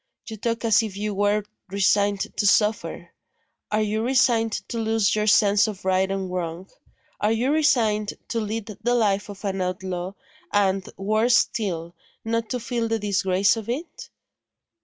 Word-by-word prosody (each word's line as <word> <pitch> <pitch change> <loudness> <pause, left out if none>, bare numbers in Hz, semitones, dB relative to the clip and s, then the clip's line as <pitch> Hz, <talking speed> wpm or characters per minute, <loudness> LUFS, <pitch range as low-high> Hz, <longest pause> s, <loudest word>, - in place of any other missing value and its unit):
You 220 - -6
talk 230 +2 -2
as 225 0 +5
if 210 -3 -5
you 210 0 -2
were 205 +1 +1 0.3
resigned 200 +1 +2
to 205 - +1
suffer. 210 +1 +1 0.6
Are 215 0 +2
you 215 +1 -1
resigned 235 -3 +2 0.2
to 235 - -3
lose 220 -2 +1
your 210 0 0
sense 205 0 +5
of 200 -3 -7
right 190 0 +2
and 195 -1 -3
wrong? 180 +1 -4 0.5
Are 210 - +1
you 240 +5 +1
resigned 230 -9 +2
to 230 - -1
lead 220 0 -3 0.2
the 240 +2 +1
life 205 -3 +1
of 200 0 -9
an 195 -1 -1
outlaw, 185 0 -3 0.4
and 195 -2 +1
worse 215 +5 +3
still 170 -7 -1 0.3
not 230 -1 -1
to 250 - -2
feel 235 -1 -2
the 225 0 0
disgrace 200 -1 +2
of 225 -1 -7
it?" 300 +8 -5
210 Hz, 160 wpm, -24 LUFS, 195-225 Hz, 0.6 s, as